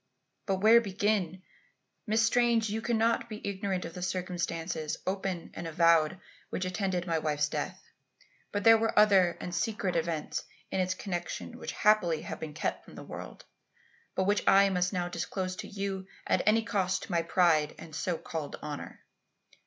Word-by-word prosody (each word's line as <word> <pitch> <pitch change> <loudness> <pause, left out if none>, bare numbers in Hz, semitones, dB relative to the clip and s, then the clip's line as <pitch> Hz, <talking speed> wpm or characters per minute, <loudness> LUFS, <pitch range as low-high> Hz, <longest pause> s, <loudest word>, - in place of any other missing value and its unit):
But 190 -1 0
where 225 +3 +7
begin? 195 -3 -1 0.6
Miss 220 +1 +3
Strange, 230 -2 +3
you 220 +1 -2
cannot 230 0 +1
be 215 -1 -6
ignorant 195 -2 -2
of 165 - -7
the 180 - -7
circumstances, 175 -3 -2
open 190 -2 -3
and 170 - -5
avowed, 165 +1 +3 0.3
which 185 - -2
attended 185 -1 -1
my 165 -2 0
wife's 150 -1 0
death. - - -4 0.7
But 205 0 -2
there 225 0 +8
were 225 0 0
other 195 -5 +5
and 180 - -5
secret 195 -1 -1
events 165 -2 -1 0.3
in 190 - 0
its 185 0 0
connection 175 -3 -5
which - - -5
happily 195 -7 +3
have - - -6
been 150 -2 -6
kept 155 - -2
from - - -14
the - - -8
world, - - -9 0.7
but 190 - +2
which 205 +2 +2
I 195 0 +7
must 180 -1 +1
now 180 -3 -1
disclose 185 +1 -3
to - - -6
you 195 -2 -4 0.2
at - - +2
any 225 +1 +5
cost 190 -5 0
to 200 - -8
my 170 -1 +2
pride 165 -4 +3
and 160 - -11
so 175 0 -1
called 155 -3 -5
honour. 150 -1 -7
185 Hz, 170 wpm, -30 LUFS, 170-205 Hz, 0.7 s, there